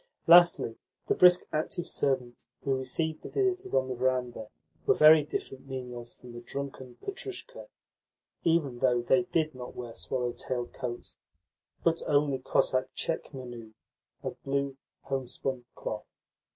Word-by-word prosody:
Lastly, 170 -9 +6 0.3
the - - +2
brisk, 180 0 +7
active 160 +3 -1
servants 130 -6 -1 0.2
who 135 -1 +1
received 155 +5 -1
the - - -8
visitors 380 -1 0
on 130 0 +3
the 130 - -2
verandah 125 -3 -1 0.4
were - - +6
very 155 0 +8
different 135 -2 -5
menials 125 -2 -6
from 125 - -13
the 120 - -8
drunken 130 -1 -6
Petrushka, 395 +5 -5 0.8
even 155 -7 +2
though 125 -2 +3
they 180 +8 +3
did 160 -3 0
not 125 -1 -8
wear 120 -2 -6
swallow 125 0 -2
tailed 120 0 -4
coats, 120 -1 -6 0.7
but 165 0 +2
only 145 -2 +2
Cossack 130 0 +1
tchekmenu 120 -8 -4 0.5
of - - -5
blue 140 0 -1 0.3
homespun 130 -1 -3
cloth. 105 -1 -5
130 Hz, 135 wpm, -29 LUFS, 125-155 Hz, 0.8 s, very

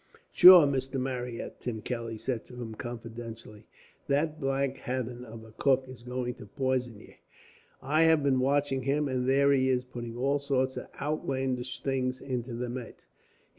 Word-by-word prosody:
"Sure, 180 -3 +10
Mr. 135 -1 -1
Marryat," 125 -2 -4
Tim 110 -3 -4
Kelly 115 -2 -4
said 115 +1 -3
to 125 - -13
him 120 -2 -6
confidentially, 115 -2 -8 0.4
"that 150 +2 0
black 135 0 0
hathen 125 -1 -4
of 115 -2 -10
a 110 - -14
cook 135 +3 +2
is 130 -2 -11
going 125 0 -3
to 105 - -12
pison 125 -1 -2
ye. - - -16 0.7
I 150 +4 +2
have 160 -2 +4
been 135 -2 +3
watching 135 0 +1
him, 140 +3 0
and 130 -1 -1
there 140 +1 +4
he 130 -1 +3
is 125 -1 +1
putting 120 -2 -7
all 140 +3 +1
sorts 130 -2 0
of - - -6
outlandish 130 -4 -2
things 130 -1 -1
into 125 -3 -4
the 125 +1 -3
mate. 120 -1 -7
130 Hz, 170 wpm, -29 LUFS, 120-135 Hz, 0.7 s, Sure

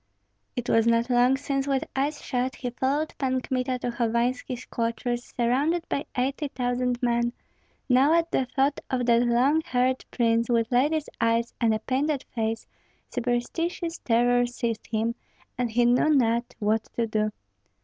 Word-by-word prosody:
It 245 -1 -3
was 225 0 +3
not 235 +2 +2
long 245 +2 +4
since 275 0 -2
with 270 -1 +1
eyes 285 +3 -1
shut 255 0 -1
he 250 -1 -4
followed 280 +5 -1
Pan 260 -1 +1
Kmita 255 0 -1
to 245 0 -3
Hovanski's 240 +1 -1
quarters 240 +1 -3
surrounded 285 +9 +1
by 280 - -2
eighty 275 +4 0
thousand 245 -1 -1
men; 235 0 +1 0.5
now 265 +3 +4
at 335 0 +1
the 260 - +1
thought 275 +2 +1
of 250 -2 0
that 235 0 +4
long 250 +6 +3
haired 255 0 0
prince 230 -1 +1
with 230 0 +1
lady's 295 +5 +2
eyes 230 +1 +1
and 230 -1 +4
a 220 - +2
painted 275 +3 0
face, 225 -1 -2 0.5
superstitious 330 +8 -2
terror 245 +1 +3
seized 235 -2 -3
him, 225 +1 0 0.4
and 245 -1 -1
he 240 +2 +2
knew 245 +5 +4
not 240 -5 +2
what 215 +1 0
to 235 - +1
do. 215 -1 0
245 Hz, 160 wpm, -26 LUFS, 235-270 Hz, 0.5 s, long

